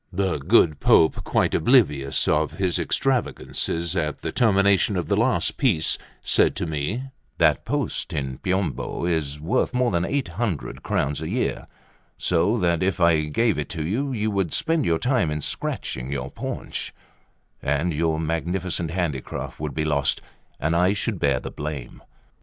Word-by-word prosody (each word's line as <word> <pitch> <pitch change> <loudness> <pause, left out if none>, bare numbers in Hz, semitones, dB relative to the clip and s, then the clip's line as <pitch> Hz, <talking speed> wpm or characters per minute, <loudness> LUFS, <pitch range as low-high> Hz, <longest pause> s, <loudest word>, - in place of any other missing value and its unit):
The 95 -4 0
good 75 +2 +3
Pope, 80 - +4
quite - - +1
oblivious 75 - +3
of 75 0 +1
his 95 -3 0
extravagances 90 -9 -1
at 75 -4 -2
the - - -3
termination 100 -3 +3
of 90 - -3
the 100 - +3
last 115 +5 +1
piece, 90 - +2 0.2
said - - +3
to - - -2
me: 80 - -2 0.3
"That - - +3
post - - -2
in 65 -2 -2
the 65 - -9
Piombo 95 -2 -1
is 75 -4 -1
worth 110 - 0
more 125 -1 +2
than 85 -2 +1
800 105 - -2
crowns 70 +1 -1
a - - -4
year, - - -2 0.5
so 90 +7 +2
that 85 -5 +1
if 95 0 0
I 85 -3 +4
gave 100 +4 +1
it 75 - -4
you, 105 - -1
you 110 -3 -1
would 95 -5 -1
spend 165 -2 +1
your 85 -1 +2
time 125 - +1
in 75 0 -2
scratching 65 -2 -3
your 70 - -3
paunch, - - -5 0.7
and 75 +5 0
your 80 +1 0
magnificent 85 +1 -2
handicraft 85 -7 -3
would 75 -2 -4
be 75 0 0
lost, 70 -2 +2 0.4
and 80 +2 0
I 90 +3 +3
should 105 -1 -2
bear 70 -4 +2
the - - -7
blame." 75 -4 -6
85 Hz, 160 wpm, -24 LUFS, 75-100 Hz, 0.7 s, Pope